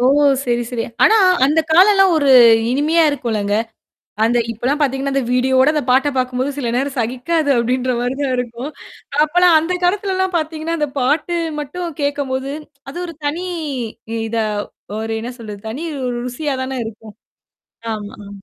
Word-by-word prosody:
ஓ! 250 - +3 0.4
சரி, 240 -1 0
சரி. 235 -2 -2 0.2
ஆனா 445 - +6 0.3
அந்த 300 +4 +3
காலம்ல்லாம் 385 +2 +6
ஒரு 285 -3 +2 0.4
இனிமையா 305 +6 +2
இருக்கும்லங்க. 220 -7 -2 0.7
அந்த 235 +2 +2
இப்பலாம் 250 +6 -1
பாத்தீங்கன்னா, 275 0 0
அந்த 275 -1 +1
வீடியோவோட 260 +2 +3
அந்த 300 - 0
பாட்ட 265 +3 +4
பாக்கும்போது 255 +1 -1
சில 265 -4 -2
நேரம் 270 +2 -1
சகிக்காது 260 +7 -1
அப்டின்ற 250 +2 0
மாரி 245 +1 -1
தான் 270 -2 0
இருக்கும். 245 +2 -4 0.5
அப்பலாம் 350 +2 +4
அந்த 325 +3 -2
காலத்துலலாம் 375 0 0
பாத்தீங்கன்னா, 315 +1 -3
அந்த 300 - +1
பாட்டு 295 +7 0 0.2
மட்டும் 330 +2 -5
கேட்கபோது, 275 -2 -2 0.4
அது 290 - -9
ஒரு 335 -2 -8
தனி 300 +4 -1 0.9
இதா 225 0 -1 0.5
ஒரு 225 0 -4
என்ன 240 +2 -5
சொல்றது? 210 -3 -8
தனி 265 +9 -5 0.2
ஒரு 245 - -2
ருசியா 275 +3 -3
தானே 260 0 -4
இருக்கும். 220 -1 -10 0.8
ஆமா, 205 -1 -7
ஆ. - - -11
270 Hz, 150 wpm, -18 LUFS, 245-315 Hz, 0.9 s, ஆனா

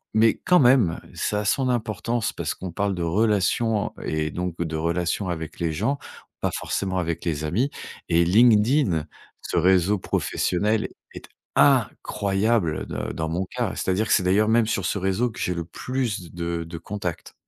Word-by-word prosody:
Mais 110 +1 +5
quand 180 -1 +5
même, 120 - +4 0.2
ça 105 0 -1
a - - -5
son 130 +6 +1
importance 120 0 -1
parce - - -3
qu'on 95 -1 -6
parle 100 +2 -1
de 90 - -3
relations 105 +4 +2
en - - -9
et 80 0 -1
donc 90 +1 -4
de 80 -2 -2
relations 85 +4 -1
avec 80 -3 -5
les 85 -2 0
gens, 115 - -1 0.4
pas - - 0
forcément 95 -2 -2
avec 85 -1 -3
les 80 -3 -1
amis. 115 - +1 0.4
Et 85 0 +4
LinkedIn, 105 - +4 0.4
ce - - -3
réseau 95 +3 +4
professionnel, 105 +4 0 0.3
est - - -9 0.3
incroyable 100 -3 +2
de - - -4
dans 80 0 -3
mon 85 +4 -1
cas. - - -3
C'est-à-dire 95 +4 0
que - - +3
c'est 95 - +4
d'ailleurs 100 +4 +3
même 115 -1 +3
sur 100 -4 -1
ce - - 0
réseau 95 +6 0
que - - -11
j'ai 90 - 0
le 85 -1 -4
plus 110 -2 -3
de 85 -1 -3
de 85 0 -7
contacts. 90 -1 -5
95 Hz, 175 wpm, -24 LUFS, 85-110 Hz, 0.4 s, Mais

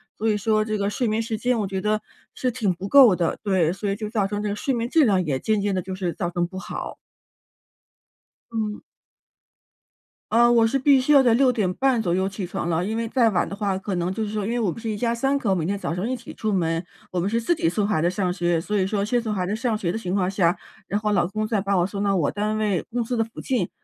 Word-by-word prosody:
所 220 - -1
以 210 - +2
说 215 +1 +1
这 215 0 -2
个 200 0 0
睡 240 +3 -1
眠 215 +1 0
时 225 -1 -3
间， 245 0 +1
我 210 - 0
觉 190 0 -3
得 215 0 +1 0.4
是 255 - -1
挺 225 -5 0
不 185 +3 -6
够 250 -5 +7
的， 170 -2 -1
对， 185 -5 +2
所 200 +1 -3
以 195 - 0
就 215 +1 -5
造 205 -4 +1
成 205 +1 -3
这 210 - -1
个 205 - -2
睡 270 - -2
眠 235 0 -1
质 315 +4 +4
量， 190 -4 +2
也 135 -4 -1
渐 215 +8 0
渐 200 0 0
地 185 - 0
就 190 +1 -6
是 180 -3 -2
造 175 - -3
成 175 0 -1
不 185 +2 -7
好。 - - -6 1.6
嗯。 215 -2 -3 1.5
呃， 240 +1 +5
我 230 -1 +5
是 270 +4 +1
必 275 0 +5
须 265 +4 +1
要 280 - +8
在 245 -3 +4
6 260 +1 +4
点 210 -7 0
半 265 -3 +2
左 175 -5 0
右 190 +1 +1
起 195 0 -5
床 175 - -4
了， 165 +1 +1
因 215 +4 -2
为 230 0 -1
再 235 -1 +3
晚 185 - 0
的 200 - -6
话， 200 -2 -1
可 195 +1 -4
能 175 +1 -1
就 220 +3 -2
是 210 - -3
说 210 -2 -2
因 220 - -2
为 240 - 0
我 210 -6 +1
们 230 - -8
是 225 - -4
一 215 - -2
家 235 +2 0
3 270 +4 +1
口， 215 -8 0
每 175 -4 -1
天 200 +4 -1
早 180 - -3
上 185 +7 -2
一 255 - 0
起 235 - -11
出 215 - -2
门， 165 -3 0 0.3
我 180 - -1
们 185 +4 0
是 230 - +1
自 235 +9 +1
己 235 - 0
送 205 +3 0
孩 200 -7 +1
子 170 - +2
上 180 -1 -1
学， 175 -2 +1
所 210 +6 -3
以 190 -1 +1
说 200 0 -1
先 240 +2 +1
送 220 -2 -3
孩 185 -3 -1
子 200 +4 -1
上 230 -1 -1
学 175 -5 -1
的 205 - -3
情 185 -4 -3
况 185 -2 +1
下， 185 -2 +2 0.3
然 205 - -1
后 210 0 -1
老 175 -3 +2
公 215 +3 -3
再 215 -3 0
把 200 -1 0
我 175 - +3
送 200 +1 -3
到 200 -1 +2
我 165 -6 +1
单 210 +1 -1
位 205 -5 0
公 240 0 0
司 245 - -2
的 225 - +2
附 225 - -11
近， 255 -3 -1
210 Hz, 305 characters per minute, -24 LUFS, 185-225 Hz, 1.6 s, 要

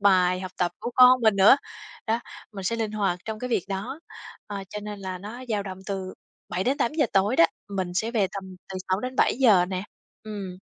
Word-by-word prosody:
bài, 185 -2 +4
học 185 -1 -6
tập 175 -1 +1
của - - -3
con 255 0 +8
mình 220 -3 +4
nữa. 200 +7 +8 0.5
Đó, 225 +2 +1 0.3
mình 195 -2 -7
sẽ 230 +5 0
linh 220 -2 -2
hoạt 195 -4 0
trong 220 -1 -4
cái 250 - -4
việc 195 - +1
đó, 205 +10 -4 0.5
ờ, 205 - -5
cho 210 - -5
nên 210 0 -6
là 185 -1 -5
nó 215 +7 -8
dao 210 -3 0
động 190 -1 -7
từ 190 -2 -4 0.3
7:00-8:00 265 - +1
tối 200 +6 +3
đó, - - +8 0.2
mình 190 -3 -2
sẽ 220 +5 0
về 220 -5 +2
tầm 195 - -5 0.3
từ - - -4
6:00-7:00 220 -1 +3
nè. 185 -1 -2 0.4
Ừm. 200 -4 -6
205 Hz, 195 wpm, -26 LUFS, 190-230 Hz, 0.5 s, con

